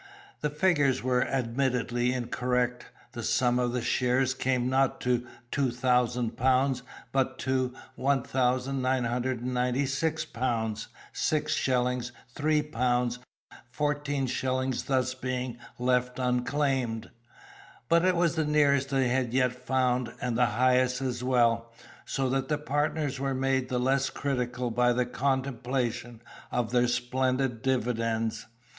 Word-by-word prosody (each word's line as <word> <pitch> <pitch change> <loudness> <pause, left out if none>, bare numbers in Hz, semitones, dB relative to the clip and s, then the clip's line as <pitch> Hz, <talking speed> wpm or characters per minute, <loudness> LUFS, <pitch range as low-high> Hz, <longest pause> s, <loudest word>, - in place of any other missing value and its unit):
The 150 - 0
figures 145 -5 +2
were 125 -1 +2
admittedly 125 -1 0
incorrect; 125 0 -1 0.2
the 120 -2 -6
sum 125 +2 +2
of 120 -1 +1
the 125 -1 -2
shares 125 +2 +2
came 130 -2 0
not 135 0 +2
to 125 -1 0 0.2
2000 125 -2 +1
pounds, 130 +1 +2 0.3
but 130 -1 0
to 130 -1 -1 0.2
1996 130 +2 0
pounds, 115 -3 -2 0.3
6 155 -1 0
shillings: 125 -1 0 0.2
3 150 +1 +1
pounds, 125 -3 0 0.5
14 145 +1 -1
shillings 130 0 -1 0.4
being 125 -1 -3
thus - - -16
left 125 0 +1
unclaimed. 125 -2 0 0.8
But 170 0 +4
it 185 0 +3
was 170 -1 +2
the 160 -1 0
nearest 140 -2 +3
they 135 -2 +2
had 125 -1 0
yet 125 -1 +3
found, 125 -1 0
and 125 -1 -2
the 125 +1 +4
highest 125 +3 +2
as 125 -2 -2
well, 115 -2 +2 0.3
so 135 -1 -1
that 135 0 0
the 150 - 0
partners 145 -1 -1
were 135 -1 -1
made 130 -1 0
the 125 - 0
less 135 +2 +2
critical 125 -3 -2
by 125 +1 +3
the 125 +1 +1
contemplation 125 -3 -2 0.3
of 120 -2 -1
their 125 0 +3
splendid 125 0 0
dividends. 115 -3 -1
125 Hz, 125 wpm, -28 LUFS, 125-135 Hz, 0.8 s, But